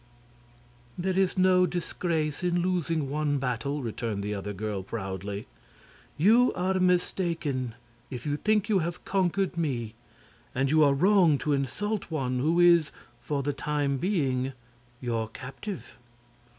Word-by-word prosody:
"There 185 +1 -1
is 190 0 +2
no 185 -1 +5
disgrace 165 -2 -2
in 175 -1 +1
losing 165 -5 0
one 145 +1 0
battle," 135 +2 -2
returned 110 -3 -3
the 105 +1 -2
other 100 0 -4
girl, 105 0 -3
proudly. 100 0 -5 0.7
"You 225 +9 +5
are 185 +1 0
mistaken 170 -8 0 0.3
if 125 -2 -7
you 145 -1 0
think 215 +3 +1
you 210 -4 +3
have 170 0 -4
conquered 190 0 0
me, 125 -9 -2 0.6
and 135 +1 +1
you 155 0 +5
are 140 -1 +4
wrong 180 -1 +5
to 150 - +2
insult 205 +10 -2
one 130 -6 -1
who 160 +6 +2
is, 170 -3 +5 0.3
for 140 +2 -2
the 145 +1 -1
time 145 0 -1
being, 135 -8 0 0.5
your 115 -3 -2
captive." 135 - -7
150 Hz, 135 wpm, -28 LUFS, 130-180 Hz, 0.7 s, no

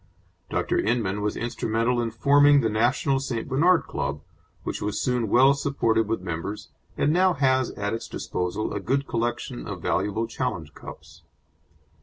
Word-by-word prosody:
Dr. - - 0
Inman 105 -4 0
was 105 0 -2
instrumental 115 +1 0
in 115 - -1
forming 145 +4 +5
the 110 - 0
National 125 +5 +1
St. 125 -4 -3
Bernard 165 +7 +3
Club, - - -4 0.4
which - - -4
was 105 0 -2
soon 125 -4 0
well 130 +5 +6
supported 115 -6 0
with 115 -3 -1
members, 90 +4 -5 0.3
and 150 - +2
now 185 +1 +4
has 130 -2 +2
at 105 +1 -2
its 115 - -4
disposal 90 +4 -3
a - - -2
good 135 +8 0
collection 115 - -3
of - - -5
valuable 105 +4 0
challenge 110 - -4
cups. - - -12
115 Hz, 155 wpm, -25 LUFS, 105-135 Hz, 0.4 s, well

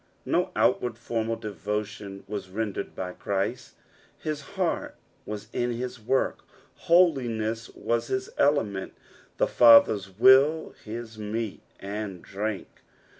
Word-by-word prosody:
No - - +1
outward, 120 -2 +2
formal 115 -1 -2
devotion 105 -2 -5
was 100 -2 -5
rendered 100 0 -4
by 90 -1 -4
Christ; 100 +7 -3 0.4
his 155 -1 -4 0.2
heart 180 -3 -1 0.3
woe 105 - -3 0.2
in 120 0 0
his 125 +1 -5
work, 125 +5 0 0.4
holiness 120 -10 +2
was 115 0 -1
his 130 0 -2
element, 110 -10 +1 0.4
the - - +3
Father's 115 -4 +6
will 130 +9 +5
his 110 0 -7
meat 105 0 -4 0.2
and 100 -2 -5
drink. 105 0 -5
110 Hz, 115 wpm, -27 LUFS, 105-125 Hz, 0.4 s, Father's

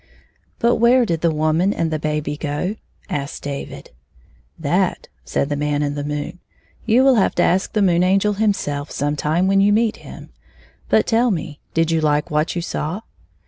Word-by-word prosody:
" - - -42
But 235 0 +2
where 240 +2 +4
did 165 -6 -2
the 170 - +3
woman 155 +4 +1
and 165 -5 -1
the 155 - -1
baby 150 -1 -2
go? 150 +7 -3 0.2
" - - -40
asked 140 -4 -4
David. 140 -1 -6 0.4
" - - -34
That," - - 0
said - - -1
the 145 - -1
Man 145 0 -1
in 145 0 -1
tHe 145 0 -4
moon, 150 +4 -4 0.2
" - - -32
you 240 +3 +4
will 265 -2 +5
have 195 - +2
to - - +3
ask 185 +2 +1
the 210 - +2
Moon 175 -2 +3
Angel 195 +3 +2
himself 195 -9 -1
sometime 150 +4 0
when 195 0 +4
you 205 +1 +4
meet 225 +1 +2
him. - - -11 0.6
But - - +4
tell 235 +2 +2
me, 160 -6 -3 0.2
did 165 0 +2
you 165 -1 +1
like 150 -1 +1
what 150 +3 0
you 170 - -2
saw 165 +5 -3
165 Hz, 200 wpm, -20 LUFS, 150-205 Hz, 0.6 s, will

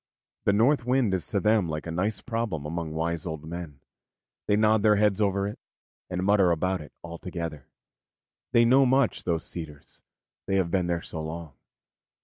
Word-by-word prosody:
The 100 - +4
North 120 +6 +3
Wind 125 -4 +2
is 95 - -1
to 100 - 0
them 105 -4 +2
like 75 0 -4
a 85 - -4
nice 95 +6 -1
problem 115 - -3
among 80 +1 -3
wise 85 +1 -2
old 80 -2 -5
men; 80 -4 -7 0.7
they 105 - +4
nod 110 0 +4
their 105 0 +5
heads 105 0 +2
over 100 -1 +1
it, 105 - -7 0.5
and 90 0 -2
mutter 100 -2 +4
about 90 +2 0
it 75 - -11
all 85 0 -8
together. 85 -6 -6 0.8
They 115 0 +5
know 130 +3 +5
much, 130 -1 +2
those 85 -2 0
cedars, 75 -4 -8 0.5
they 95 - +1
have 90 -3 +1
been 90 -2 +1
there 85 -1 -1
so 80 - -4
long. 80 -1 -6
90 Hz, 180 wpm, -27 LUFS, 80-105 Hz, 0.8 s, their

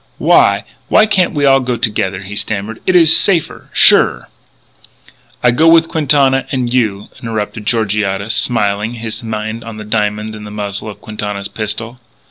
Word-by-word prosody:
"Why - - +3 0.2
why 215 - +4
can't 190 -6 +1
we 145 -1 +1
all 135 -1 +5
go 125 -2 -2
together," 105 -4 -2
he 100 +2 -8
stammered. 105 +1 -3
"It 185 - +2
is 165 -2 +6
safer, 175 -6 0
surer - - +4 0.6
" - - -30
"I 125 - +5
go 155 +7 +2
with 165 0 +5
Quintana 140 -3 +2
and 125 -3 -2
you," 105 -5 -1
interrupted 110 -2 -4
Georgiades, 105 -2 -1
smilingly; 105 -1 -1
his 110 +1 -6
mind 110 0 -5
on 115 -1 -9
the 105 - -8
diamond 105 0 -2
in 105 - -10
the 105 - -8
muzzle 105 0 -5
of 105 - -11
Quintana's 105 -2 -5
pistol. 115 +3 -5
110 Hz, 165 wpm, -15 LUFS, 105-130 Hz, 0.6 s, is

